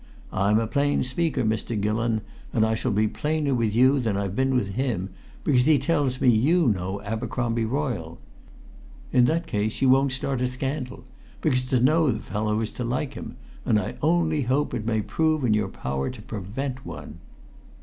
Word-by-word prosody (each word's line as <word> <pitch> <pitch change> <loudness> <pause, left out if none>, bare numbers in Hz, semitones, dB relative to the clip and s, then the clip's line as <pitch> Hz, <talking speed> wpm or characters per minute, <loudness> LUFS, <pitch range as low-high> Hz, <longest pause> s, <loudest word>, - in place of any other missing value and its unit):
I'm 100 +3 +3
a 115 - +1
plain 145 +5 +1
speaker, 130 +1 0
Mr. 110 0 -1
Gillon, 110 +2 0 0.3
and 110 -2 +3
I 110 - +1
shall 115 +2 -1
be 105 +2 +2
plainer 150 +3 -1
with 115 -4 0
you 130 +4 +5
than 110 -5 0
I've 100 -1 -2
been 130 +1 +1
with 105 -6 +1
him, 100 -4 -2 0.3
because 130 -2 +3
he 155 -2 +6
tells 135 -2 0
me 135 - +2
you 135 +7 +4
know 95 0 -2
Abercromby 115 +2 -1
Royle. 115 - -2 1.0
In 125 -1 +6
that 165 +5 +1
case 105 +1 -2
you 135 - +3
won't 135 +1 +4
start 130 0 -2
a 125 - +2
scandal 130 +1 -4 0.4
because 130 -5 +2
to 130 -1 +2
know 155 +5 +4
the 110 - 0
fellow 105 +1 -1
is 110 - -2
to 125 - -5
like 130 +4 -2
him - - -8 0.3
and 105 - +3
I 100 - -4
only 160 -1 +2
hope 135 +3 0
it 115 -3 -3
may 110 -2 +1
prove 155 +4 +1
in 110 - +3
your 105 -2 +1
power 65 -5 -3
to - - -9
prevent 125 +7 -5
one." 75 0 -9
125 Hz, 190 wpm, -25 LUFS, 105-135 Hz, 1.0 s, he